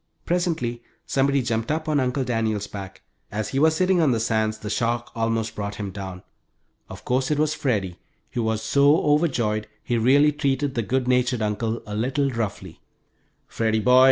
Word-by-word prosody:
Presently 165 -10 -1 0.2
somebody 140 0 +1
jumped 115 -1 -1
up 155 +1 -2
on 150 -2 +2
Uncle 130 +1 0
Daniel's 110 -4 -1
back. 95 -2 -9 0.3
As 105 +1 -3
he 135 - -1
was 160 +2 +4
sitting 185 0 +3
on 150 -5 +4
the 115 - +1
sands 110 -1 0
the 105 -1 -6
shock 120 +1 -1
almost 115 -1 -1
brought 100 -1 -4
him 100 -2 -5
down. 95 -2 -7 0.7
Of 95 +2 -10
course 130 +1 +1
it 150 - +1
was 155 0 +2
Freddie, 100 - -1 0.3
who 120 - -2
was 110 -1 -1
so 140 +8 +4
overjoyed 125 -9 +1 0.2
he 120 -1 0
really 140 +6 +5
treated 140 -1 -1
the 120 - 0
good 130 +3 -1
natured 125 -2 +2
uncle 110 +2 -2
a 105 - -7
little 135 +5 0
roughly. 100 -7 -4 0.7
"Freddie 110 -1 0
boy! 125 +3 +5
120 Hz, 180 wpm, -24 LUFS, 110-140 Hz, 0.7 s, really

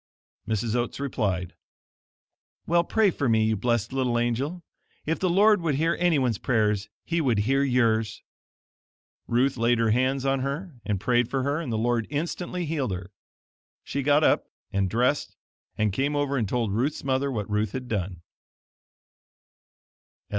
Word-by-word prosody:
Mrs. 110 0 -1
Oats 120 +2 -1
replied, 100 -10 -2 1.1
"Well, 170 +1 +3
pray 210 +2 +2
for 140 -6 -1
me, 110 -1 +3
you 110 0 +2
blessed 115 +2 0
little 130 -3 +1
angel; 130 +9 -1 0.4
if 160 +2 -1
the 185 - +1
Lord 205 +2 +5
would 160 -4 0
hear 165 +3 +1
anyone's 140 - +2
prayers, 105 -4 +1 0.2
he 170 0 0
would 125 -7 +2
hear 135 +6 +2
yours." 115 -5 +1 1.0
Ruth 125 +3 +2
laid 120 +1 +3
her 115 -1 +2
hands 130 +3 +1
on 135 0 +2
her 145 +7 -4
and 105 -3 -1
prayed 120 +3 +2
for 135 0 -1
her 145 +4 0
and 140 -8 -4
the 110 - 0
Lord 115 0 0
instantly 175 +4 -3
healed 145 -9 -1
her. 90 +1 -7 0.7
She 140 - -3
got 145 +2 +3
up - - +3 0.3
and 100 -1 +1
dressed 125 +7 0 0.4
and 105 -2 +1
came 140 +7 0
over 145 -1 0
and 115 -7 0
told 115 -4 0
Ruth's 130 +8 -1
mother 135 +1 0
what 105 -5 -3
Ruth 105 -1 -1
had 130 -1 -5
done. 95 -6 -3
125 Hz, 160 wpm, -26 LUFS, 110-145 Hz, 1.1 s, Lord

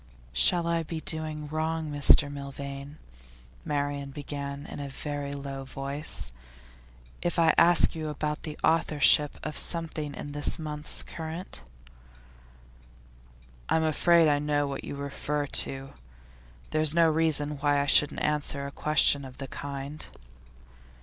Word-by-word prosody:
'Shall 165 - +3
I 170 0 0
be 160 0 -5
doing 155 -1 -2
wrong, 160 0 -3
Mr 145 0 +6
Milvain,' 140 +1 -8 0.7
Marian 145 -1 -3
began 140 0 -6
in - - -8
a 140 -1 -5
very 145 +1 -5
low 140 -1 -6
voice, 135 - -4 0.9
'if 175 - -2
I 165 -2 +4
ask 175 +1 +5
you 155 -1 -5
about 150 0 -3
the 155 -2 -7
authorship 150 -2 +4
of 155 -1 -4
something 155 -4 -3
in 145 - -7
this 145 0 +1
month's 150 -1 -1
Current?' 160 - -7 2.1
'I'm 160 - +2
afraid 165 +1 +4
I 145 -1 +2
know 145 0 0
what 140 -1 -5
you - - -6
refer 140 +1 -3
to. 135 -1 +2 0.8
There's 155 0 +5
no 170 -1 +5
reason 155 -2 +1
why 145 0 +2
I 140 - 0
shouldn't 145 +1 +3
answer 145 -2 0
a 140 - -6
question 145 -1 +3
of 130 -1 -11
the 135 - -6
kind. 140 +1 -6
145 Hz, 135 wpm, -27 LUFS, 140-155 Hz, 2.1 s, Mr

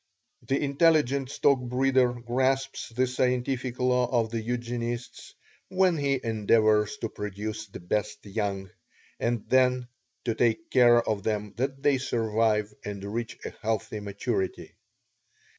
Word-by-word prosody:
The 135 - -1
intelligent 140 -2 +2
stockbreeder 125 -2 +2
grasps 130 +2 0
this 125 +2 -1
scientific 125 0 0
law 125 -1 +2
of 115 -3 +1
the 115 -1 -2
Eugenists 120 0 -4 0.3
when 185 -2 +3
he 140 -2 +1
endeavors 110 -1 +2
to 115 - -2
produce 105 +1 -5
the 95 - -10
best 105 +4 -2
young, 100 -2 -3 0.5
and 115 -2 -1
then 125 -1 +3 0.4
to 115 - +1
take 120 +8 0
care 120 -2 +5
of 105 -2 0
them 105 -1 -2
that 135 +2 -2
they 140 -2 +3
survive 110 -3 0
and 100 -1 -6
reach 115 0 -4
a - - -4
healthy 110 -1 -2
maturity. 100 -1 -3
120 Hz, 125 wpm, -27 LUFS, 110-130 Hz, 0.5 s, care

